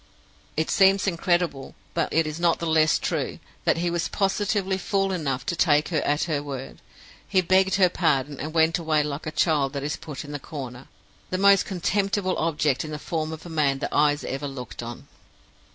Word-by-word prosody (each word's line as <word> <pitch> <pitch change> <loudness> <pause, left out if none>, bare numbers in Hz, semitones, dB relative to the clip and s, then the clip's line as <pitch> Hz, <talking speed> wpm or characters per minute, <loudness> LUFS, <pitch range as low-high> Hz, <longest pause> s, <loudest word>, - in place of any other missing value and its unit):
It 160 - 0
seems 195 0 +4
incredible, 175 -6 0 0.2
but 165 -2 -1
it 165 0 +2
is 155 +1 -5
not 170 -1 +3
the 170 - -4
less 160 -1 +3
true, - - -2 0.3
that - - +3
he 175 +1 0
was 170 0 -1
positively 195 -1 0
fool 195 +1 0
enough 140 -8 -2
to 170 - -1
take 150 -3 +3
her 160 -4 0
at 145 +1 +1
her 155 -4 -1
word. 135 -2 -7 0.5
He 190 - +3
begged 190 +1 +3
her 190 -2 +5
pardon, 150 -5 0
and 155 +3 -4
went 160 +1 +3
away 155 -2 +1
like 145 +1 -5
a - - -2
child 150 -3 +1
that 140 -1 -3
is 150 - -2
put 150 -1 -7
in 145 - -9
the 145 - -4
corner 130 -3 -8 0.4
the 185 - -1
most 200 0 +5
contemptible 195 0 0
object 155 -4 +1
in 155 - -7
the 150 - -4
form 155 0 -3
of 160 +1 -8
man 150 -5 +1
that 135 - -4
eyes 145 0 +3
ever 135 +2 -3
looked 125 -4 -7
on! 120 0 -8
160 Hz, 200 wpm, -25 LUFS, 145-180 Hz, 0.5 s, her